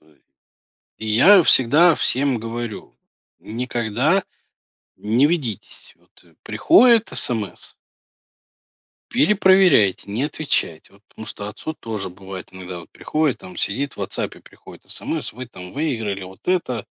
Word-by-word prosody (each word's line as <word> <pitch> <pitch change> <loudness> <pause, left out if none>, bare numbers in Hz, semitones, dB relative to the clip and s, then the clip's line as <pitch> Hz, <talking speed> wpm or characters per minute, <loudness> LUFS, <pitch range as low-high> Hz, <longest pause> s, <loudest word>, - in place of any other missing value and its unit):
Ой. 75 -3 -28 0.8
И 110 - -7
я 175 - +6
всегда 150 +7 +5
всем 130 -2 +1
говорю: 115 -1 -7 0.4
"Никогда 120 - -1 0.7
не 115 +7 +2
ведитесь". 140 - -4
Вот, - - -28
э, - - -25
приходит 235 -2 +4
смс 110 -5 -2 1.4
перепроверяйте, 185 - +3
не 115 +6 -2
отвечайте. 145 - -2
Вот 100 +1 -23
потому 110 - -11
что 105 -1 -6
отцу 155 +9 -6
тоже 110 - -5
бывает 95 0 -10
иногда 90 -1 -8
вот 85 - -16
приходит. 155 -4 -2
Он 90 -1 -11
сидит 140 +8 -1
в - - -23
"Вотсапе", - - -4
приходит - - -16
смс: - - -3
"Вы 125 +1 -8
там 90 -5 -12
выиграли 115 -10 -3
вот 95 +1 -13
это, 145 - -1
115 Hz, 125 wpm, -21 LUFS, 100-155 Hz, 1.4 s, я